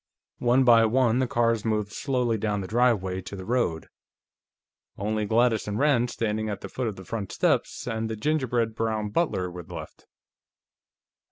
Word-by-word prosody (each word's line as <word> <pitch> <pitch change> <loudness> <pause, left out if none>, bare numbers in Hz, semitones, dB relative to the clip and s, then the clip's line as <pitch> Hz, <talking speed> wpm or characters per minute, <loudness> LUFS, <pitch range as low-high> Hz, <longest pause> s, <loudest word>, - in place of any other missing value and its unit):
One 125 +2 +3
by 115 -2 +6
one 120 +1 +2
the 130 - +1
cars 115 -4 +1
moved 105 -2 -1
slowly 125 -4 0
down 105 -1 -1
the 95 - -5
driveway 105 -5 +1
to 95 - -8
the 95 -1 -7
road. 115 -9 0 1.1
Only 105 +1 -1
Gladys 115 0 +2
and 105 0 -2
Rand, 125 -3 +3
standing 110 -2 -2
at 100 - -4
the - - -7
foot 130 -2 -3
of 105 - -3
the 95 - -11
front 105 -1 -4
steps, - - 0
and 110 -1 -2
the 110 - -3
gingerbread 120 -3 0
brown 110 -1 -1
butler 100 - 0
were 90 0 -7
left. 85 - -10
110 Hz, 170 wpm, -26 LUFS, 105-120 Hz, 1.1 s, by